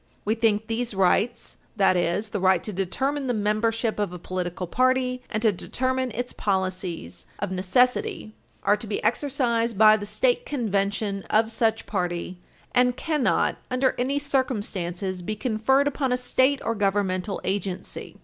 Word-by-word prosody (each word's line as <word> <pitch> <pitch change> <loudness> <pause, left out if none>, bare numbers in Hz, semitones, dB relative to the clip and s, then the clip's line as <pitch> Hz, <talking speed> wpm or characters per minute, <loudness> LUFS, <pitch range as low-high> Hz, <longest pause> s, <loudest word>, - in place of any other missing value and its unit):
We 215 - +2
think 220 -2 +1
these 230 -1 -2
rights, 195 +4 +1 0.2
that 195 -3 +4
is, 180 +5 0
the 205 - -3
right 185 -2 +3
to 210 - -5
determine 265 +10 -1
the 245 - 0
membership 220 +2 0
of 205 -4 0
a 180 - -6
political 180 0 -4
party 255 +4 +1
and 215 +1 -2
to 220 - +5
determine 260 +6 -1
its 245 +2 -4
policies, 185 - -3
of 205 -2 -3
necessity 250 - +1 0.3
are 205 +1 +4
to 220 - -8
be 205 - -3
exercised 235 -4 0
by 215 0 +7
the 205 -1 -6
State 230 +4 +1
Convention 200 -5 -1
of 220 +1 +3
such 225 -1 0
party, 180 -2 -3 0.3
and 250 0 +3
cannot, 305 -5 +1
under 255 +1 +2
any 265 +3 0
circumstances, 205 -10 -2
be 215 +5 -3
conferred 255 +5 +2
upon 270 -2 -1
a 250 - +2
state 260 +2 +2
or 230 - +1
governmental 195 -2 0
agency." 195 -1 -4
215 Hz, 155 wpm, -25 LUFS, 195-250 Hz, 0.3 s, by